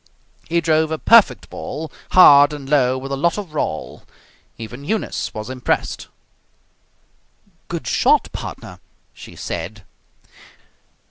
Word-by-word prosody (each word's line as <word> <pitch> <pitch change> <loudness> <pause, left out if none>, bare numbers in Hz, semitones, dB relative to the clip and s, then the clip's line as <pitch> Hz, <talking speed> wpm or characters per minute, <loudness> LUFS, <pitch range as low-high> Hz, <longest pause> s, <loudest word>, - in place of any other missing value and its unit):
He 170 0 +1
drove 160 -1 +1
a 160 - -2
perfect 230 +5 +4
ball, 155 +3 -6 0.2
hard 145 -5 +7
and 140 -2 -8
low 130 -3 +2
with 135 +1 -7
a - - 0
lot 170 +7 0
of 190 -7 -7
roll. 80 - -4 0.6
Even 120 +4 -9
Eunice 215 +8 -3
was 110 0 -7
impressed. 130 -1 -3 1.6
"Good - - -5
shot, - - +2
partner!" - - -8 0.3
she - - -13
said. 90 +5 -6
145 Hz, 120 wpm, -20 LUFS, 125-160 Hz, 1.6 s, hard